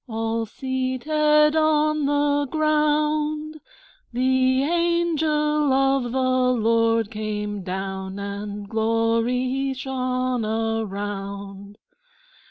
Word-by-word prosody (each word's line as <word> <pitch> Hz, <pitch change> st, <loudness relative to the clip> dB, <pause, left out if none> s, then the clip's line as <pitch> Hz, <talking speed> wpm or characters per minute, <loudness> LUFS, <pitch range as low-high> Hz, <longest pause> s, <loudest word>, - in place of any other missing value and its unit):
All 225 Hz, 0 st, -2 dB
seated 300 Hz, +5 st, +1 dB
on 305 Hz, -1 st, +2 dB
the 290 Hz, 0 st, +1 dB
ground, 305 Hz, 0 st, 0 dB, 0.5 s
The 260 Hz, +1 st, +2 dB
Angel 310 Hz, -3 st, +1 dB
of 270 Hz, -2 st, +2 dB
the 255 Hz, 0 st, +2 dB
Lord 230 Hz, 0 st, +2 dB
came 210 Hz, -1 st, -4 dB
down, 190 Hz, +1 st, -5 dB
And 200 Hz, 0 st, -6 dB
glory 230 Hz, +5 st, 0 dB
shone 255 Hz, -2 st, -2 dB
around. 200 Hz, -2 st, -4 dB
255 Hz, 75 wpm, -23 LUFS, 220-300 Hz, 0.5 s, on